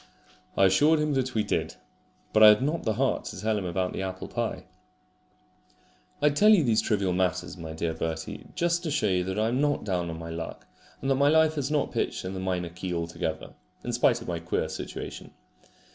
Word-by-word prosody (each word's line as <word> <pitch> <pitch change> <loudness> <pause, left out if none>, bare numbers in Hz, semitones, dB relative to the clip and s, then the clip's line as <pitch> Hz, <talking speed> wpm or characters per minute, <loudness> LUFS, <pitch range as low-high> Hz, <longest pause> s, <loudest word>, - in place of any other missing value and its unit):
I 95 - +6
assured 150 +12 +4
him 150 -1 0
that 130 -2 -1
we 110 - +2
did; - - -2 0.6
but 110 - +4
I 110 - +11
had 105 +3 +6
not 155 +4 0
the 110 - +1
heart 135 +1 0
to 105 - -7
tell 110 +2 0
him 100 -3 -2
about 90 +1 -1
the - - -3
apple 95 0 -5
pie. 120 -2 -3 1.6
I 150 - +6
tell 205 +9 +4
you 205 -7 +6
these 115 -4 +3
trivial 100 -4 0
matters, 90 -2 -1
my 80 -1 -7
dear 80 +1 -2
Bertie, 80 0 -5
just 170 0 +1
to 170 - -3
show 145 -6 0
you 90 -3 +2
that 95 +1 -3
I 110 +1 +2
am 125 +4 0
not 145 -1 +1
down 90 -4 -1
on 80 - -5
my 80 0 -7
luck, 80 0 -6 0.4
and 135 - 0
that - - +4
my 140 - +5
life 160 0 +4
is 140 -2 -2
not 150 -2 0
pitched - - -2
in 95 - -4
the 95 - -4
minor 90 -2 -2
key 90 +2 -6
altogether, 85 -1 -3 0.3
in - - -3
spite - - +2
of - - -13
my - - -2
queer - - -2
situation. - - -7
105 Hz, 220 wpm, -27 LUFS, 90-145 Hz, 1.6 s, I